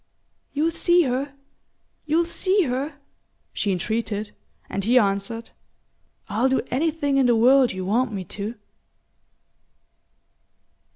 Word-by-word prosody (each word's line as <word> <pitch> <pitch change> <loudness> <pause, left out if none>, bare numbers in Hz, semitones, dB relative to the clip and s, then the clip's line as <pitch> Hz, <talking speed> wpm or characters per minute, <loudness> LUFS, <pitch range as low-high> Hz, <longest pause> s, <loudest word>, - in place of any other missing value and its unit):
"You'll 310 +3 0
see 345 +1 +3
her? 275 +1 -2 0.7
You'll 325 +3 +2
see 380 +3 +1
her?" 275 +2 -3 0.6
she 205 - -1
entreated; 210 +2 -2 0.4
and 195 - -3
he 240 +5 +3
answered: 205 +1 0 0.8
"I'll 225 +6 +1
do 265 - +1
anything 290 0 0
in 265 -2 +4
the 240 - +4
world 255 +3 +5
you 185 -1 -5
want 230 +6 +1
me 195 -3 -4
to." 205 +6 -5
250 Hz, 115 wpm, -23 LUFS, 210-290 Hz, 0.8 s, world